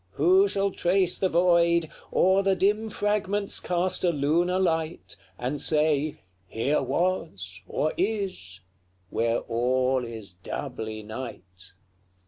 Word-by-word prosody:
who 185 +6 +4
shall 200 0 0
trace 180 0 +1
the 190 - +2
void, 170 -1 +3 0.2
O'er 190 +1 +4
the 195 -1 +2
dim 210 +4 +1
fragments 205 -1 0
cast 180 +1 -1
a 180 - +4
lunar 170 +4 +1
light, 165 -3 -1 0.2
And 135 +3 -3
say, 150 -1 +1 0.3
'Here 125 +10 0
was, 100 - -2
or 155 - -1
is,' 185 - -3 0.5
where 115 0 0
all 125 +2 +1
is 110 -5 -8
doubly 110 +4 -6
night? 100 -6 -9
165 Hz, 115 wpm, -26 LUFS, 120-185 Hz, 0.5 s, who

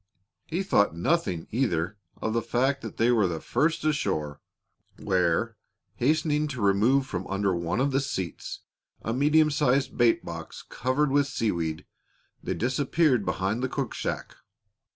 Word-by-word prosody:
He 175 +4 -1
thought 105 - +2
nothing, 90 - 0
either, 100 -7 0 0.2
of 110 - -2
the 115 - +1
fact 135 +4 0
that - - -8
they 115 +2 +3
were 95 -9 +2
first 155 - 0
ashore, 75 - -1 0.6
where, 90 -4 0 0.4
hastening 150 +2 +1
to 130 -4 -6
remove 110 +7 +3
from 95 -7 -5
under 100 0 0
one 85 +4 -1
of 140 +2 +2
the 135 - +2
seats 95 -11 -4 0.4
a 115 - -1
medium 150 +4 +4
sized 140 -2 +1
bait 120 -1 +3
box - - -7
covered 130 +3 0
with 145 0 +3
seaweed, 85 - -2 0.6
they - - -3
disappeared 130 - +1
behind 100 +5 -1
the 130 - -1
cook - - -3
shack. - - -4
125 Hz, 145 wpm, -27 LUFS, 95-140 Hz, 0.6 s, medium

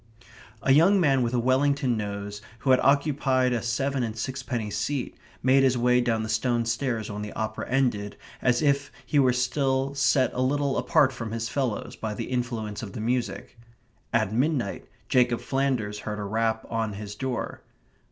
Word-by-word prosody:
A 135 - +3
young 180 +7 +5
man 140 -6 +3
with 120 0 0
a - - +2
Wellington 130 +1 +2
nose, 105 -1 -5 0.2
who 135 - +2
had 130 - +6
occupied 135 -3 +2
a 120 - 0
seven 135 +3 -1
and 115 -2 -3
sixpenny 120 -3 -3
seat, 120 +6 -2 0.3
made 130 +2 +5
his 130 -2 +3
way 125 +1 +3
down 115 -2 0
the - - -3
stone 115 +2 0
stairs 115 -2 -2
when 105 0 -5
the 105 - -5
opera 110 0 -4
ended, 120 -6 0 0.2
as 125 +2 +2
if 140 -1 +1
he 145 - +2
were 130 -2 +5
still 130 +2 0
set 135 -2 +2
a 125 - -1
little 140 +1 +1
apart 150 -6 +3
from 115 -3 -5
his 115 0 -3
fellows 130 -6 -2
by 110 -1 -4
the - - -5
influence 120 -4 -3
of 100 -5 -7
the - - -6
music. 120 +1 -2 0.5
At 95 - +1
midnight 130 -4 0 0.2
Jacob 120 -2 +3
Flanders 130 -7 -1
heard 105 0 -5
a 105 - -4
rap 110 +2 -1
on 115 -2 -2
his 105 0 -7
door. 125 +3 -4
125 Hz, 180 wpm, -26 LUFS, 110-135 Hz, 0.5 s, had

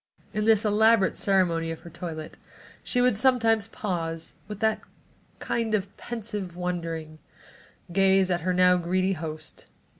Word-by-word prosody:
In 215 0 -1
this 220 -1 +4
elaborate 215 -1 +4
ceremony 175 -4 +1
of 165 - -6
her 170 - -12
toilet, 155 -2 -7 0.5
she 250 - 0
would 250 -3 +3
sometimes 225 -3 +3
pause, 165 -7 -4
and - - -33
with 210 +1 -6
a 220 0 +2 0.6
kind 225 -2 -1
of 200 -1 -4
pensive 210 -6 -6
wondering, 165 -3 -4 0.7
gaze 190 0 +4
at 175 0 0
her 185 +2 0
now 180 0 +5
greedy 185 +2 0
host. 155 -2 -7
190 Hz, 145 wpm, -26 LUFS, 170-215 Hz, 0.7 s, now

